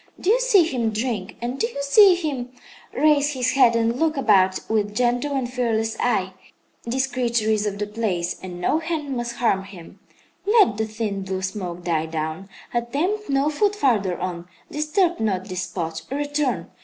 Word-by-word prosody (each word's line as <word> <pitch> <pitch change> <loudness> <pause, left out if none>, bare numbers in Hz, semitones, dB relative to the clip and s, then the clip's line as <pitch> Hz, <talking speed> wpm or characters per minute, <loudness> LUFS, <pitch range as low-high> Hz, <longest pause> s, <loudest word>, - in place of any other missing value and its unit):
Do 380 - +2
you 485 - +4
see - - +5
him 250 -8 -1
drink, 215 -3 -3
and 245 +3 -3
do 460 - +1
you 470 - -10
see 375 +6 +7
him 285 -8 -3 0.4
raise 295 0 +3
his 255 -1 0
head 250 -4 +4
and 230 +2 +1
look 320 -2 +1
about 190 -7 +3
with 210 -1 0
gentle 245 +4 +1
and 260 -2 -1
fearless 230 -3 -1
eye? 190 -6 0 0.5
This 260 +3 0
creature 235 -4 0
is 215 -1 +1
of 200 -1 -3
the 210 - -2
place, 205 -5 -2
and 180 -1 -7
no 300 - +1
hand 315 -4 -3
must 240 -1 -3
harm 225 -5 +1
him. 190 -4 -13 0.5
"Let 415 - +5
the 220 0 -1
thin, 215 -2 -3
blue 190 0 -4
smoke 180 -3 -4
die 160 -2 0
down. 160 +4 -4 0.2
Attempt 300 - -1
no 275 +2 +2
foot 410 +7 +1
farther 210 - +1
on. 175 -1 -4 0.2
Disturb 340 +4 +1
not 195 -4 -1
this 185 -1 -3
spot. 165 -2 -4
Return. 285 - -2
235 Hz, 180 wpm, -23 LUFS, 195-285 Hz, 0.5 s, see